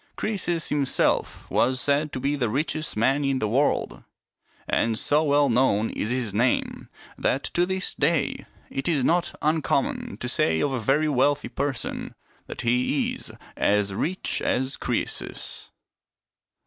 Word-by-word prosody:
Croe 215 Hz, -, -2 dB
sus 170 Hz, -3 st, -1 dB
himself 140 Hz, -3 st, 0 dB
was 130 Hz, +1 st, +2 dB
said 145 Hz, +2 st, +1 dB
to -, -, -4 dB
be 140 Hz, +3 st, 0 dB
the 125 Hz, -5 st, 0 dB
richest 155 Hz, +2 st, -2 dB
man 135 Hz, +6 st, +2 dB
in 135 Hz, -1 st, +1 dB
the 110 Hz, -, 0 dB
world; 120 Hz, -, 0 dB, 0.6 s
and 115 Hz, -1 st, +1 dB
so 150 Hz, +6 st, +2 dB
well 145 Hz, -1 st, +3 dB
known 115 Hz, -3 st, +2 dB
is 105 Hz, -, -3 dB
his 125 Hz, -4 st, -1 dB
name 120 Hz, +4 st, 0 dB, 0.3 s
that, 135 Hz, -, +1 dB
to 175 Hz, +1 st, 0 dB
this 190 Hz, 0 st, -1 dB
day, 150 Hz, +2 st, 0 dB, 0.2 s
it 135 Hz, -, -3 dB
is 150 Hz, -6 st, +2 dB
not 175 Hz, +1 st, +1 dB
uncommon 155 Hz, 0 st, 0 dB
to -, -, -4 dB
say 80 Hz, 0 st, +1 dB
of 140 Hz, -, +1 dB
a 130 Hz, -, -1 dB
very 140 Hz, +7 st, +2 dB
wealthy 145 Hz, +1 st, +2 dB
person 140 Hz, -4 st, -3 dB, 0.3 s
that -, -, -6 dB
he 125 Hz, +4 st, +1 dB
is -, -, -6 dB
" -, -, -21 dB
as 100 Hz, -1 st, +2 dB
rich 175 Hz, -, -1 dB
as 130 Hz, +1 st, 0 dB
Croesus." -, -, -4 dB
140 Hz, 155 wpm, -25 LUFS, 120-150 Hz, 0.6 s, well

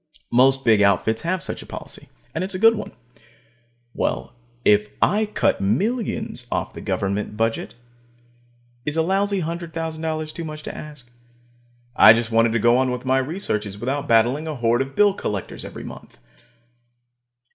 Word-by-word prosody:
Most 135 Hz, +2 st, +4 dB
big 110 Hz, -3 st, +5 dB
outfits 100 Hz, +3 st, +2 dB
have 175 Hz, +1 st, -2 dB
such -, -, -5 dB
a -, -, -12 dB
policy, -, -, -9 dB, 0.2 s
and 170 Hz, -, -2 dB
it's 190 Hz, 0 st, -3 dB
a -, -, -1 dB
good 225 Hz, +3 st, +6 dB
one. 220 Hz, -, -6 dB, 1.0 s
Well, 65 Hz, +1 st, -2 dB, 0.3 s
if 105 Hz, 0 st, +4 dB
I 215 Hz, +1 st, +2 dB
cut 210 Hz, -, 0 dB
millions 200 Hz, -, -1 dB
off -, -, -2 dB
the -, -, -8 dB
government 100 Hz, +2 st, -2 dB
budget, 115 Hz, 0 st, -1 dB, 1.1 s
is 150 Hz, +4 st, -3 dB
a 160 Hz, -, +3 dB
lousy 195 Hz, +1 st, +1 dB
$100,000 160 Hz, -1 st, -4 dB
too 170 Hz, -, -6 dB
much 155 Hz, -1 st, -7 dB
to -, -, -6 dB
ask? 150 Hz, -5 st, -10 dB, 0.9 s
I 110 Hz, -, +9 dB
just 115 Hz, 0 st, -1 dB
wanted 115 Hz, 0 st, +3 dB
to -, -, +2 dB
go 120 Hz, +2 st, +4 dB
on 130 Hz, 0 st, +2 dB
with 125 Hz, 0 st, -4 dB
my 130 Hz, +1 st, +3 dB
researches 110 Hz, -, -3 dB
without 135 Hz, +6 st, -3 dB
battling 120 Hz, +7 st, +3 dB
a 155 Hz, -, -3 dB
horde 120 Hz, -1 st, +1 dB
of 135 Hz, 0 st, -5 dB
bill 205 Hz, -1 st, +5 dB
collectors 105 Hz, -, -5 dB
every -, -, -8 dB
month. -, -, -11 dB
135 Hz, 160 wpm, -22 LUFS, 115-165 Hz, 1.1 s, I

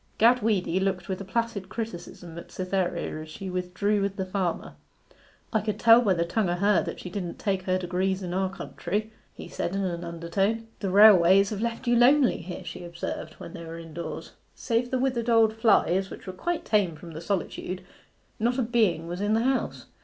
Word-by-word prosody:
Gad 240 Hz, +3 st, +5 dB
Weedy 190 Hz, -4 st, +1 dB
looked 190 Hz, -1 st, -1 dB
with 190 Hz, 0 st, -3 dB
a -, -, -4 dB
placid 205 Hz, -1 st, -2 dB
criticism 175 Hz, -6 st, -7 dB
at -, -, -12 dB
Cytherea 180 Hz, -4 st, -2 dB
as 155 Hz, -, -10 dB
she 185 Hz, +4 st, -6 dB
withdrew 185 Hz, +3 st, 0 dB
with 195 Hz, 0 st, -1 dB
the 190 Hz, -, -2 dB
farmer. 185 Hz, -2 st, -2 dB, 0.8 s
'I 220 Hz, -, +2 dB
could 215 Hz, 0 st, -3 dB
tell 230 Hz, 0 st, +7 dB
by 200 Hz, -6 st, +2 dB
the 170 Hz, 0 st, 0 dB
tongue 195 Hz, +2 st, 0 dB
o' 175 Hz, -, +1 dB
her 200 Hz, 0 st, +3 dB
that -, -, -5 dB
she 180 Hz, -, -8 dB
didn't 180 Hz, -4 st, -4 dB
take 195 Hz, -2 st, -1 dB
her 185 Hz, 0 st, +2 dB
degrees 185 Hz, +1 st, -1 dB
in 175 Hz, -1 st, -4 dB
our 190 Hz, 0 st, 0 dB
county,' 205 Hz, +3 st, -4 dB, 0.2 s
he -, -, -9 dB
said 175 Hz, -, -3 dB
in 195 Hz, -, 0 dB
an 175 Hz, -2 st, -3 dB
undertone. 175 Hz, +7 st, -1 dB
'The 195 Hz, -, -2 dB
railways 195 Hz, -1 st, +7 dB
have 210 Hz, -1 st, -3 dB
left 235 Hz, +2 st, -3 dB
you 240 Hz, 0 st, +3 dB
lonely 255 Hz, +3 st, +5 dB
here,' 175 Hz, +2 st, -7 dB
she -, -, -7 dB
observed, 170 Hz, -2 st, -5 dB
when -, -, -10 dB
they 170 Hz, -, -8 dB
were 165 Hz, 0 st, -7 dB
indoors. 165 Hz, 0 st, -7 dB, 0.2 s
Save 235 Hz, +1 st, -1 dB
the 260 Hz, -, 0 dB
withered 250 Hz, -2 st, 0 dB
old 225 Hz, -2 st, +5 dB
flies, 195 Hz, -4 st, +3 dB
which -, -, -10 dB
were 185 Hz, -, -6 dB
quite 340 Hz, -, -3 dB
tame 200 Hz, -6 st, +2 dB
from 165 Hz, +2 st, -11 dB
the 160 Hz, 0 st, -7 dB
solitude, 185 Hz, 0 st, -3 dB, 0.6 s
not 240 Hz, +3 st, +1 dB
a 260 Hz, -, +2 dB
being 220 Hz, -8 st, +1 dB
was 175 Hz, +2 st, -5 dB
in 210 Hz, +1 st, +2 dB
the 225 Hz, -, +2 dB
house. 265 Hz, +1 st, -1 dB
195 Hz, 205 wpm, -27 LUFS, 175-225 Hz, 0.8 s, tell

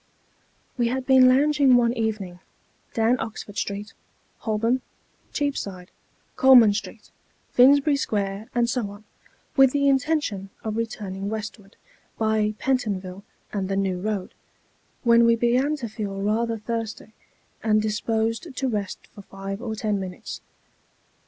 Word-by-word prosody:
WE 240 Hz, -, +3 dB
had 255 Hz, +2 st, -2 dB
been 260 Hz, -1 st, +7 dB
lounging 280 Hz, 0 st, +4 dB
one 235 Hz, -1 st, +3 dB
evening, 215 Hz, -6 st, -3 dB, 0.6 s
down 230 Hz, +2 st, +2 dB
Oxford 210 Hz, -2 st, -6 dB
Street, 205 Hz, +1 st, -4 dB, 0.5 s
Holborn, 230 Hz, +3 st, 0 dB, 0.5 s
Cheapside, 200 Hz, -, -3 dB, 0.4 s
Coleman 245 Hz, -5 st, +7 dB
Street, 215 Hz, +1 st, -7 dB, 0.4 s
Finsbury 280 Hz, +3 st, +5 dB
Square, 205 Hz, -4 st, -2 dB
and 240 Hz, -1 st, +3 dB
so 235 Hz, -4 st, -1 dB
on, 205 Hz, +1 st, -12 dB, 0.5 s
with 270 Hz, -2 st, +6 dB
the 280 Hz, -1 st, +2 dB
in 270 Hz, -1 st, +5 dB
tention 250 Hz, -10 st, -2 dB
of 215 Hz, -1 st, -3 dB
returning 200 Hz, -4 st, -4 dB
westward, 215 Hz, -1 st, -7 dB, 0.4 s
by 220 Hz, -1 st, +1 dB
Pentonville 200 Hz, -8 st, -2 dB, 0.3 s
and 195 Hz, -2 st, -2 dB
the 195 Hz, -, -1 dB
New 190 Hz, -2 st, -1 dB
Eoad, 205 Hz, -2 st, -3 dB, 0.7 s
when 235 Hz, -1 st, +6 dB
we 230 Hz, 0 st, +5 dB
began 250 Hz, +6 st, +2 dB
to 260 Hz, -6 st, -5 dB
feel 205 Hz, -2 st, -5 dB
rather 225 Hz, +3 st, 0 dB
thirsty, 220 Hz, 0 st, -5 dB, 0.5 s
and 215 Hz, -1 st, +3 dB
disposed 225 Hz, +6 st, -1 dB
to 270 Hz, -, -1 dB
rest 205 Hz, -5 st, -3 dB
for 205 Hz, -, -11 dB
five 195 Hz, +1 st, -7 dB
or 225 Hz, -3 st, -4 dB
ten 210 Hz, -2 st, -1 dB
minutes. 185 Hz, -1 st, -7 dB
220 Hz, 135 wpm, -24 LUFS, 205-250 Hz, 0.7 s, been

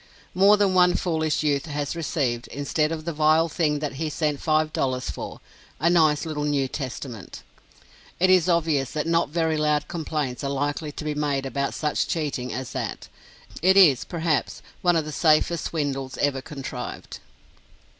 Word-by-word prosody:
More 200 Hz, +3 st, +6 dB
than 200 Hz, -2 st, +2 dB
one 180 Hz, -1 st, +5 dB
foolish 160 Hz, -3 st, 0 dB
youth 145 Hz, 0 st, 0 dB
has 145 Hz, 0 st, -3 dB
received, 135 Hz, -7 st, -2 dB
instead 150 Hz, +3 st, -1 dB
of 160 Hz, -1 st, -5 dB
the 170 Hz, -, -2 dB
vile 155 Hz, +2 st, +3 dB
thing 155 Hz, -2 st, 0 dB
that 145 Hz, -2 st, -4 dB
he 160 Hz, -, 0 dB
sent 150 Hz, -2 st, -1 dB
five 155 Hz, 0 st, +1 dB
dollars 130 Hz, -1 st, -1 dB
for, -, -, -7 dB, 0.4 s
a 170 Hz, +4 st, +3 dB
nice 155 Hz, -3 st, +3 dB
little 155 Hz, -2 st, -3 dB
New 145 Hz, -2 st, +1 dB
Testament. 125 Hz, -, -7 dB, 0.8 s
It 185 Hz, +1 st, +4 dB
is 185 Hz, -1 st, +4 dB
obvious 160 Hz, -5 st, +1 dB
that 150 Hz, 0 st, -1 dB
no 165 Hz, +1 st, +2 dB
very 160 Hz, +1 st, 0 dB
loud 150 Hz, -1 st, +1 dB
complaints 150 Hz, -5 st, -3 dB
are 140 Hz, -, -1 dB
likely 145 Hz, +2 st, -2 dB
to 150 Hz, -, -7 dB
be 150 Hz, -, -1 dB
made 145 Hz, -2 st, -1 dB
about 140 Hz, +1 st, -2 dB
such 150 Hz, -1 st, -1 dB
cheating 140 Hz, -6 st, -2 dB
as 130 Hz, -1 st, -5 dB
that. -, -, -5 dB, 0.5 s
It 190 Hz, +3 st, +4 dB
is, 145 Hz, -9 st, +6 dB
perhaps, 165 Hz, -1 st, -2 dB, 0.2 s
one 175 Hz, -1 st, +3 dB
of 160 Hz, -2 st, +1 dB
the 155 Hz, -, -5 dB
safest 155 Hz, +2 st, +2 dB
swindles 135 Hz, -4 st, -3 dB
ever 140 Hz, -2 st, 0 dB
contrived. 130 Hz, -3 st, -7 dB
150 Hz, 170 wpm, -24 LUFS, 140-165 Hz, 0.8 s, More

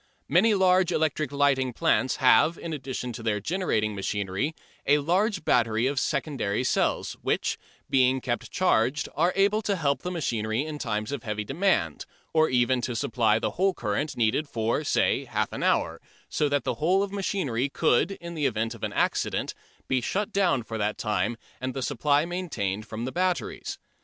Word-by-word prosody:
Many 225 Hz, -2 st, +4 dB
large 185 Hz, -1 st, +4 dB
electric 155 Hz, -2 st, 0 dB
lighting 135 Hz, -3 st, +2 dB
plants 130 Hz, +2 st, +2 dB
have 150 Hz, +5 st, +4 dB
in 165 Hz, -, -5 dB
addition 130 Hz, -3 st, -4 dB
to 115 Hz, -, -7 dB
their 110 Hz, -2 st, 0 dB
generating 110 Hz, -, 0 dB
machinery 100 Hz, +8 st, -2 dB, 0.3 s
a 145 Hz, -, +6 dB
large 180 Hz, +4 st, 0 dB
battery 115 Hz, -1 st, +2 dB
of 135 Hz, +1 st, +1 dB
secondary 135 Hz, -8 st, -1 dB
cells, -, -, 0 dB
which, -, -, -1 dB, 0.3 s
being 130 Hz, 0 st, +3 dB
kept 120 Hz, -1 st, -3 dB
charged, 145 Hz, -6 st, +1 dB
are 170 Hz, +4 st, +2 dB
able 200 Hz, +2 st, +3 dB
to 205 Hz, -2 st, 0 dB
help 140 Hz, -5 st, 0 dB
the 180 Hz, -, -3 dB
machinery 120 Hz, -7 st, -1 dB
in 155 Hz, -1 st, -6 dB
times 105 Hz, -2 st, -2 dB
of 140 Hz, -4 st, -3 dB
heavy 105 Hz, -1 st, -3 dB
demand, 175 Hz, -, 0 dB, 0.3 s
or 160 Hz, 0 st, +4 dB
even 125 Hz, 0 st, +2 dB
to 120 Hz, -1 st, -3 dB
supply 110 Hz, -2 st, +2 dB
the 115 Hz, -, -1 dB
whole 190 Hz, 0 st, +1 dB
current 120 Hz, +8 st, -2 dB
needed 120 Hz, +6 st, +1 dB
for, 115 Hz, +6 st, -1 dB
say, -, -, +1 dB
half -, -, -2 dB
an -, -, -4 dB
hour, -, -, +1 dB, 0.3 s
so 150 Hz, -, 0 dB
that 145 Hz, -2 st, +1 dB
the -, -, -1 dB
whole 185 Hz, +5 st, +3 dB
of 200 Hz, -, -4 dB
the -, -, -5 dB
machinery 145 Hz, -, -1 dB
could, 135 Hz, +4 st, +2 dB
in 170 Hz, -2 st, -8 dB
the 150 Hz, -4 st, +1 dB
event 115 Hz, -2 st, -1 dB
of -, -, -13 dB
an -, -, -2 dB
accident, -, -, 0 dB, 0.3 s
be 130 Hz, -1 st, +1 dB
shut 200 Hz, -, -2 dB
down 180 Hz, -11 st, +2 dB
for 110 Hz, 0 st, -5 dB
that 105 Hz, +1 st, -1 dB
time 105 Hz, +1 st, -1 dB, 0.2 s
and 130 Hz, +1 st, -3 dB
the 135 Hz, -, -2 dB
supply 145 Hz, +3 st, +2 dB
maintained 115 Hz, -, -3 dB
from 115 Hz, +1 st, -5 dB
the 130 Hz, -, -3 dB
batteries. 180 Hz, -, -2 dB
135 Hz, 180 wpm, -26 LUFS, 115-170 Hz, 0.3 s, a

